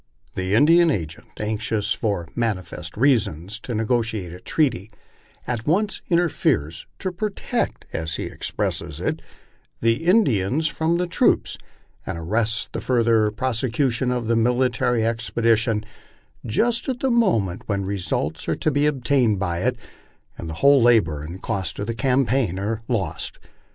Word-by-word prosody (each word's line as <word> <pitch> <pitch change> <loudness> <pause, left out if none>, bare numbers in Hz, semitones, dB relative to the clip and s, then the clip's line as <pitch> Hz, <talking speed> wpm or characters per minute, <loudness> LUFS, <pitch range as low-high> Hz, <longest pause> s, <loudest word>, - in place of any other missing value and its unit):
The 95 +2 -1
Indian 165 +7 +6
agent, 80 - -4
anxious, 105 0 -1
for 100 -7 -2
manifest 110 -7 -3
reasons, 105 - +1
to 120 - -5
negotiate 110 -5 -1
a 90 - -9
treaty, 115 - 0 0.6
at 120 0 -3
once 205 +7 +1
inter 175 0 +3
feres 80 - -1
" - - -43
to 185 - 0
protect 200 +3 -3
" - - -28
(as 80 0 -3
he - - -3
expresses - - -3
it) - - -2 0.6
the 115 +7 +1
Indians 155 - +3
from 160 +2 0
the 180 - 0
troops, 175 - +2 0.5
and - - -5
arrests 110 +6 0
the - - -3
further 115 -3 +3
prose 115 +2 -2
cution 125 0 0
of 125 -2 -1
the 115 +1 +1
military 120 0 +2
expedition 115 -1 +1 0.6
just 235 - 0
at 250 -2 -3
the 265 - +1
moment 115 - +2
when 100 -2 -1
results 90 -6 -2
are 80 - +1
to 155 - 0
be 145 +1 +2
obtained 130 -6 +2
by 85 -3 -1
it, 125 +5 0 0.6
and 85 - -7
the 80 - -5
whole 140 -1 +7
labor 105 -11 +3
and 85 +5 -8
cost 95 -6 -2
of 100 - -3
the 115 - -2
campaign 130 -5 +1
are 105 +3 -2
lost. 100 -11 -2
115 Hz, 155 wpm, -23 LUFS, 100-135 Hz, 0.6 s, whole